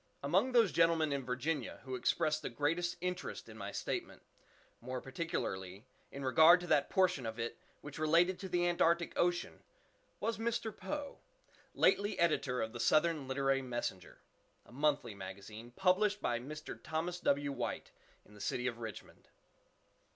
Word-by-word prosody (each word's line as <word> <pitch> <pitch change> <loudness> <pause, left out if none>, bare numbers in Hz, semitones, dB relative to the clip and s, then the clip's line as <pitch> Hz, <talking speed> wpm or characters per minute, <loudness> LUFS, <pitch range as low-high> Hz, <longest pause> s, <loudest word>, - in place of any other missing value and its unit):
Among 190 - +2
those 230 -6 +5
gentlemen 165 -3 +3
in 140 -1 -2
Virginia 130 +2 -2
who 130 - -6
expressed 155 +5 +1
the - - -4
greatest 160 +8 -1
interest 180 0 -4
in 110 - -11
my 100 -2 -6
statement, - - -4 0.6
more 130 +1 -4
particularly 110 - -4 0.3
in 140 -1 -6
regard 160 +6 +7
to - - -5
that 150 -4 +2
portion 185 -7 +2
of 110 +1 -5
it 115 0 -3 0.3
which 145 0 -8
related 170 +4 +3
to 190 - -6
the 175 -1 +2
Antarctic 170 0 +2
Ocean, 175 0 0 0.6
was 230 -1 -2
Mr. 225 -1 -2
Poe, 290 -1 -5 0.6
lately 205 +1 +3
editor 140 -7 +1
of 110 +1 -5
the 120 - -6
"Southern 155 +2 +3
Literary 135 0 +1
Messenger," 120 -8 -4 0.5
a - - -18
monthly 140 -3 +1
magazine, 100 +4 -9
published 190 - +2
by 120 - 0
Mr. 150 +5 -8
Thomas 170 +3 -3
W. 140 -3 +1
White, - - -4 0.3
in 105 - -19
the 105 - -12
city 125 - -1
of 120 -2 -2
Richmond. 110 -4 -9
150 Hz, 155 wpm, -34 LUFS, 125-175 Hz, 0.6 s, regard